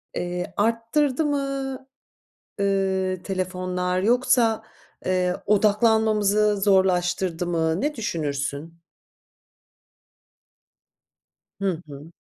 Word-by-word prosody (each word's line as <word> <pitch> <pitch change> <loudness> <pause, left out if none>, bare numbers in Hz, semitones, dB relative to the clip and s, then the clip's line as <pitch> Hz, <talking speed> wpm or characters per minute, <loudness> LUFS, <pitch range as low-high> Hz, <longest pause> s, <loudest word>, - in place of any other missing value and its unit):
eee, 180 0 -3
arttırdı 230 +7 +1
mı? 275 -2 -2 0.8
Iıı, 190 -2 0
telefonlar 185 -1 -2
yoksa, 235 -1 +3 0.4
eee, 180 -1 +1
odaklanmamızı 210 -1 +3
zorlaştırdı 180 -3 +2
mı? 165 +1 0
Ne 295 +1 -1
düşünürsün? 155 - -4 2.8
Hı 185 -4 -1
hı. 145 +3 -11
190 Hz, 70 wpm, -24 LUFS, 180-220 Hz, 2.8 s, yoksa